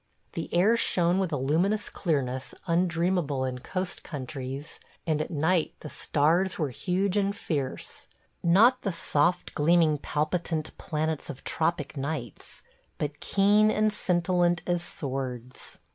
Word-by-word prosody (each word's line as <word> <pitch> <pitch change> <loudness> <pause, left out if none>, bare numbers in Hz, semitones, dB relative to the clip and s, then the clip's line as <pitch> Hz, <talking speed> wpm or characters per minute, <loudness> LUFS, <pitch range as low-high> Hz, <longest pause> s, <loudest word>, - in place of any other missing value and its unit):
The 165 - -5
air 195 +7 +4
shone 175 -4 +2
with 185 -3 0
a 145 - 0
luminous 170 +11 +1
clearness 130 -6 -2
undreamable 170 -5 +1
in 125 -1 -3
coast 185 +7 -3
countries, 135 0 -6 0.3
and 155 -2 +1
at 155 - -3
night 160 +2 +1
the 150 - -7
stars 165 +8 +1
were 150 -5 -1
huge 190 - 0
and 200 0 +1
fierce: 145 - -4 0.3
not 225 +9 +5
the 200 - -1
soft 170 +1 +1
gleaming 155 -1 +3
palpitant 155 +1 -2
planets 155 -1 -2
of 135 - -8
tropic 160 -3 -1
nights, 135 -5 -5 0.3
but 150 0 -3
keen 205 +2 +4
and 215 0 +2
scintillant 175 -2 +1
as 175 -1 0
swords. 130 -6 -5
165 Hz, 130 wpm, -28 LUFS, 145-185 Hz, 0.3 s, not